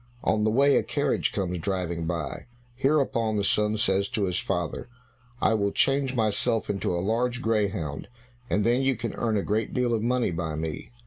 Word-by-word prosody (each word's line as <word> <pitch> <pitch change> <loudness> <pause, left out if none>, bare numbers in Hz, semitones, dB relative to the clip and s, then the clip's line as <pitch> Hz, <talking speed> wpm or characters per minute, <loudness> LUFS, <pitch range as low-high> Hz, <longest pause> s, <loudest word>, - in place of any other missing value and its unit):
On 105 -1 +2
the 110 - +3
way 140 +5 +4
a - - +3
carriage 145 -1 0
comes 90 -3 -2
driving 85 -2 -2
by. 80 -5 -4 0.3
Hereupon 130 -4 +1
the 100 - 0
son 105 +2 +2
says 100 -2 +1
to 105 - -1
his 90 -2 0
father, 90 +4 -3 0.5
"I - - +3
will 100 -2 +1
change 135 +1 +1
myself 110 -1 +1
into 100 -2 -2
a 85 +1 -2
large 120 +3 0
greyhound, 100 - -1 0.4
and 105 - +1
then 120 +4 +3
you 135 -1 +2
can 115 +1 -4
earn 110 -2 0
a 100 - 0
great 110 +1 -1
deal 125 -2 +1
of 110 - 0
money 120 -2 +1
by 80 -2 -3
me." 80 0 -4
105 Hz, 190 wpm, -26 LUFS, 95-120 Hz, 0.5 s, way